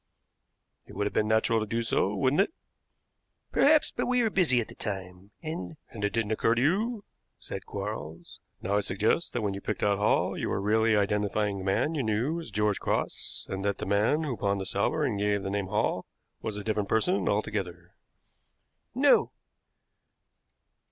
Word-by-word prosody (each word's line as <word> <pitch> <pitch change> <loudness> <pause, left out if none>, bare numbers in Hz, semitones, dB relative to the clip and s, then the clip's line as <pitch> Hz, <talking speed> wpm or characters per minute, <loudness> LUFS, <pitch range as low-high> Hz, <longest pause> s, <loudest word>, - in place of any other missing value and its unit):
"It - - -12
would 100 - -1
have 105 - -2
been 105 - +1
natural 110 +1 +3
to 110 - -3
do 115 +2 -1
so, 105 -2 +1
wouldn't 130 - +3
it?" 200 - 0 1.0
"Perhaps; 300 +1 +4
but - - -2
we 250 -1 +3
were 220 - +1
busy 160 -12 +4
at 115 - -2
the - - -11
time, 95 -1 -6
and 160 0 -5
" - - -42
"And 105 -3 -7
it 105 - +2
didn't 110 0 -1
occur 115 +1 +2
to 120 - +1
you," 210 - +1 0.3
said - - -8
Quarles. 80 +3 -6 0.2
"Now 100 +2 +1
I - - +4
suggest 105 - 0
that 120 - -1
when 100 -2 0
you 100 - -6
picked 105 - -3
out 100 -1 +2
Hall 105 - +2
you - - -2
were - - 0
really 110 +2 +3
identifying 105 0 0
the - - -6
man 100 +11 +1
you 150 - 0
knew 120 +8 0
as 165 - -7
George 105 -1 0
Cross, - - -2
and 95 0 -4
that 100 -1 0
the - - -4
man 110 +10 +2
who 140 -5 -2
pawned 100 0 0
the 95 - -4
salver 100 +12 0
and 115 -8 0
gave 100 -1 +1
the 95 - -3
name 100 -1 -1
Hall 105 +3 -1 0.3
was 110 -2 -3
a 105 - -5
different 105 -2 -1
person 180 - +2
altogether." 90 -4 -2 1.0
"No." - - +4
105 Hz, 190 wpm, -28 LUFS, 100-125 Hz, 1.0 s, Perhaps